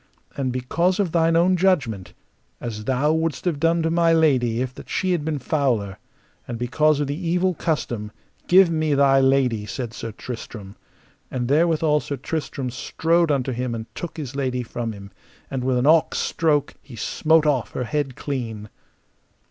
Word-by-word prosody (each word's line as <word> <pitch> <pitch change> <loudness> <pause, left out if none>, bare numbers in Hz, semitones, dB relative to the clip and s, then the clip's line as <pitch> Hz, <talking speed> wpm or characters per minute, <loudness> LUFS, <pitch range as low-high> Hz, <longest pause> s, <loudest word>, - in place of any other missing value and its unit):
And 130 -2 -1
because 170 +10 0
of 190 -5 +1
thine 165 0 +3
own 180 +2 +4
judgment, 145 - 0 0.4
as 110 -3 -6
thou 135 +5 +2
wouldst 160 0 -1
have 165 -5 0
done 165 +1 +2
to 160 - +1
my 170 0 +3
lady 130 -8 +3
if 130 0 -2
that - - -12
she 185 - 0
had 170 -4 0
been 155 -1 -2
fouler, 125 - -1 0.5
and 120 - -4
because 145 +5 +2
of 145 - +1
the 150 +6 -4
evil 180 +2 +2
custom, 120 - -2 0.4
give 185 -1 +6
me 155 -2 +1
thy 135 -1 +5
lady, 130 -6 +2
said 120 -2 -5
Sir 115 - -6
Tristram. 110 -3 -8 0.5
And 125 -2 -2
therewithal 155 +1 +3
Sir 140 -1 -5
Tristram 135 -2 -4
strode 165 +6 +1
unto 135 -3 0
him 125 -1 -2
and 110 -1 -5
took 175 - -7
his 140 -4 -6
lady 130 -3 -1
from 115 0 -4
him, 100 -1 -10 0.4
and 130 -2 -2
with 130 -1 +1
an 125 - +1
awk 160 +1 +4
stroke 150 -3 +1
he 130 - -12
smote 160 +7 +2
off 140 -6 0
her 125 - -2
head 135 0 -2
clean. 115 -7 -5
140 Hz, 175 wpm, -23 LUFS, 125-160 Hz, 0.5 s, give